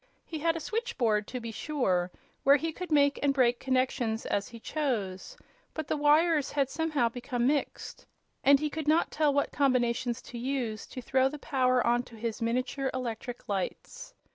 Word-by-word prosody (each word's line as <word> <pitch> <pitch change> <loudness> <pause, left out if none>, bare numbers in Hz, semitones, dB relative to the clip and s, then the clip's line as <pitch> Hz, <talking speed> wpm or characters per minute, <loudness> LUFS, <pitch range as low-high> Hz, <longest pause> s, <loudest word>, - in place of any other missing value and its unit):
He 320 - -5
had 330 +2 +1
a - - -2
"switchboard," 245 - -1
to 250 - -5
be 230 -1 -6
sure, 195 -10 0 0.3
where 275 +1 +6
he 320 +3 -1
could 360 +2 -7
make 285 -2 +4
and 280 -1 +2
break 245 -2 +3
connections 255 -4 0
as 200 0 -1
he 235 - -11
chose; 240 - -3 0.4
but 315 -2 -4
the - - +1
wires 300 0 +3
had 275 -2 +1
somehow 305 -6 +1
become 245 +1 -2
mixed, 285 +2 -2 0.4
and 280 0 +6
he 300 0 -2
could 315 -1 -4
not 315 +2 +3
tell 300 -1 +2
what 285 0 0
combinations 250 -3 +1
to 240 - -8
use 240 -4 -3
to 255 - -8
throw 260 +2 +2
the 300 - -7
power 255 -4 +1
on 240 +1 +3
to 245 -1 -14
his 225 0 -4
miniature 255 +3 -1
electric 245 -1 -5
lights. 480 - -4
260 Hz, 180 wpm, -29 LUFS, 235-295 Hz, 0.4 s, where